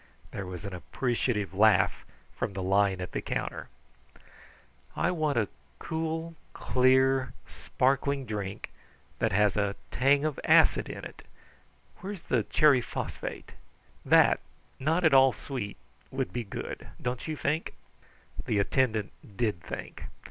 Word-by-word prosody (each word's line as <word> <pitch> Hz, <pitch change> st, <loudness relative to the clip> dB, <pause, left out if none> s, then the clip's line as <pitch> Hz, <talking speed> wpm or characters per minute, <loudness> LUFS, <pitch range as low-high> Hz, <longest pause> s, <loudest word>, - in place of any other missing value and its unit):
There 100 Hz, -2 st, -5 dB
was 90 Hz, +2 st, -7 dB
an 100 Hz, -, -5 dB
appreciative 110 Hz, +1 st, -1 dB
laugh 105 Hz, +2 st, +3 dB, 0.3 s
from -, -, -3 dB
the 95 Hz, -1 st, -4 dB
line 95 Hz, 0 st, +2 dB
at 90 Hz, -, -5 dB
the -, -, -3 dB
counter. -, -, -4 dB, 1.3 s
"I -, -, +1 dB
want 155 Hz, -6 st, 0 dB
a 110 Hz, -3 st, +2 dB, 0.3 s
clear, 160 Hz, +1 st, -3 dB, 0.2 s
cool, 130 Hz, +1 st, +3 dB, 0.2 s
sparkling 135 Hz, +1 st, 0 dB
drink 105 Hz, -3 st, -5 dB, 0.5 s
that -, -, +1 dB
has 105 Hz, +1 st, +3 dB
a 100 Hz, -1 st, 0 dB, 0.2 s
tang 140 Hz, +3 st, +3 dB
of 155 Hz, -3 st, -2 dB
acid -, -, +5 dB
in -, -, -7 dB
it. -, -, -10 dB, 0.8 s
Where's 195 Hz, -1 st, -7 dB
the 125 Hz, -, +1 dB
cherry 140 Hz, +4 st, +4 dB
phosphate? -, -, -6 dB, 0.5 s
That, -, -, +5 dB, 0.4 s
not 160 Hz, +6 st, +1 dB
at 160 Hz, -3 st, +5 dB
all 135 Hz, -1 st, +7 dB
sweet, 120 Hz, -7 st, -5 dB, 0.3 s
would 90 Hz, -, -3 dB
be 120 Hz, -2 st, -3 dB
good; 100 Hz, -, -6 dB
don't 125 Hz, +3 st, -3 dB
you 155 Hz, -, -2 dB
think?" 150 Hz, +4 st, -1 dB, 0.7 s
The 105 Hz, -, +1 dB
attendant 110 Hz, 0 st, +1 dB, 0.3 s
did 105 Hz, -8 st, 0 dB
think. -, -, -7 dB
125 Hz, 135 wpm, -29 LUFS, 100-140 Hz, 1.3 s, all